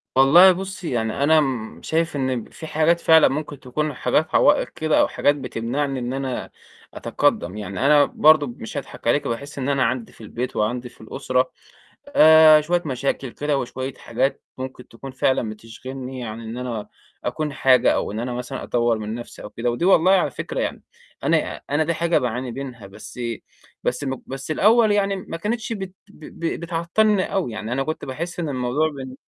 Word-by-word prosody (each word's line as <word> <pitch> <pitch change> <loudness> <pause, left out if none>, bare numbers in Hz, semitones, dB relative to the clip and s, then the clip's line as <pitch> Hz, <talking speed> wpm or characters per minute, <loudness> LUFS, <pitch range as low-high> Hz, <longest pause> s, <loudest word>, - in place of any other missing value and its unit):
والله 155 +8 +8
بُصّي، 190 -1 -5
يعني 115 +2 -1
أنا 160 +2 +5
امم، 130 -7 -1
شايف 165 0 -1
إن 130 -4 -1
في 160 - -9
حاجات 160 +3 +2
فعلًا 160 -1 +6
ممكن 145 0 -4
تكون 150 +4 -3
حاجات 135 +5 0
عوائق 145 - +4
كده 155 -1 0
أو - - +4
حاجات 145 - +2
بتمنعني 135 +1 -3
إن 125 +1 -3
أنا 135 -2 -3 0.4
أتقدَّم 90 +4 0
يعني، 105 +4 -3
أنا 145 0 +6
برضه 155 -1 +4
مش 120 +2 -8
هاضحك 135 -3 -7
عليكِ، 145 +5 +2
باحس 140 +6 -5
إن 135 +1 -1
أنا 140 -2 +2
عندي 125 -1 -2
في - - -18
البيت 120 +3 -5
وعندي 120 +3 -1
في - - -20
الأسرة 130 +3 -1 0.6
آآ، 160 - +7
شوية 175 +3 0
مشاكل 135 -1 -2
كده 145 +2 -1
وشوية 130 +1 -4
حاجات 135 - -2 0.2
ممكن 130 -1 -7
تكون 135 +4 -10
فعلًا 130 -3 0
بتشغلني 125 +4 -8
عن 110 0 -6
إن 115 +1 -7
أنا 120 -4 -4 0.4
أكون 155 -2 -2
حاجة 130 -3 +4
أو - - -2
إن 110 - -3
أنا 125 +1 -3
مثلًا 125 +2 -5
أطور 120 -2 +1
من 110 0 -4
نفسي 120 0 -9
أو 105 - -8
كده، 120 +1 -2
ودي 120 +8 -2
والله 185 0 +5
على 190 - +3
فكرة - - -4
يعني، - - -3 0.4
أنا - - 0
أنا 145 +2 +2
دي 170 +2 0
حاجة 170 +1 +2
باعاني 125 -1 -3
منها 125 -5 -7
بس 105 +5 -11 0.6
بس 125 - -1
الم 130 -2 -4
بس 135 +2 -7
الأول 215 +6 +4
يعني 200 -1 +1
ما 185 -3 -6
كانتش 220 +6 -3
بت 190 -4 -6
ب 200 -6 -16 0.2
ب 165 - -1
بتعطّلني 180 +4 +1
أوي، 185 -12 -1
يعني 110 +1 -5
أنا 135 +2 0
كنت 155 +3 -4
باحس 170 +7 -5
إن 165 - -2
الموضوع 130 +3 0
ب 135 -4 -8
135 Hz, 185 wpm, -22 LUFS, 125-160 Hz, 0.6 s, والله